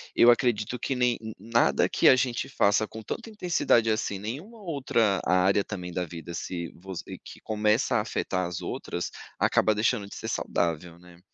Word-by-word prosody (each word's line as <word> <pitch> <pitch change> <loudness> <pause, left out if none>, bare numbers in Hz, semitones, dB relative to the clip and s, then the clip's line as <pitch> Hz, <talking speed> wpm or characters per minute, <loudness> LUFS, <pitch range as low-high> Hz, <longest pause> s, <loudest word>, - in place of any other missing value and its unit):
eu 120 - +8
acredito 120 -1 0
que 135 - -2
nem 125 -1 +2 0.2
nada 110 -10 +2
que - - +3
a 130 - +8
gente 125 0 -1
faça 105 -3 +2
com 110 - -9
tanta 225 - -6
intensidade 175 - +2
assim, 105 -2 -1
nenhuma 155 - -7
outra 130 - +1
área 95 +2 +3
também 90 -4 -6
da 90 -1 -1
vida, 85 +1 -8
se 85 0 -4
você 95 0 -8
que - - -12
começa 105 +2 +1
a - - +2
afetar 90 -4 -2
as 85 -1 -5
outras, 90 - -4 0.3
acaba 110 - +3
deixando 105 -1 +1
de - - -10
ser - - -5
saudável, 85 0 -2
né? 90 -1 -17
105 Hz, 175 wpm, -27 LUFS, 90-120 Hz, 0.3 s, eu